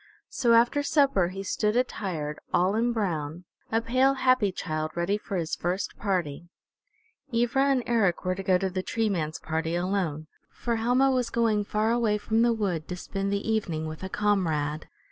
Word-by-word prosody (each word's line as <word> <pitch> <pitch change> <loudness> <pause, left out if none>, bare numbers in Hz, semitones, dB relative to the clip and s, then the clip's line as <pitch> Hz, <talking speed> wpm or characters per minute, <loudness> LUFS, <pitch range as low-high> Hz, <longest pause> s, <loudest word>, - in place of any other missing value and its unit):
So 240 -3 +2
after 240 +5 +4
supper 275 - +3
he 195 +2 -6
stood 210 +2 0
attired, 180 -11 -2
all 180 +3 +2
in 235 +3 +1
brown, 170 -7 -2 0.3
a 225 +1 +2
pale, 260 +4 +3
happy 255 -6 +3
child, 155 -3 -3
ready 170 +4 0
for 200 -2 -4
his 165 -2 -3
first 180 +3 -2
party. 175 -5 -2 0.8
Ivra 240 +3 +2
and 270 -3 +2
Eric 205 -7 +1
were 185 - +1
to 190 - -5
go 185 -1 +3
to 190 0 -2
the 185 0 -2
Tree 225 +3 -1
Man's 160 -5 -2
party 160 +1 -2
alone, 175 -4 -1 0.2
for 235 -1 -2
Helma 250 +4 +3
was 250 -2 0
going 220 -3 +1
far 215 +2 0
away 230 -3 +2
from 220 +2 0
the 235 0 +4
wood 195 -8 -2
to 180 - -4
spend 195 +2 -3
the 200 +1 -2
evening 185 -8 -1
with 155 0 -7
a 190 - -5
comrade. 160 -8 0
200 Hz, 185 wpm, -27 LUFS, 175-230 Hz, 0.8 s, after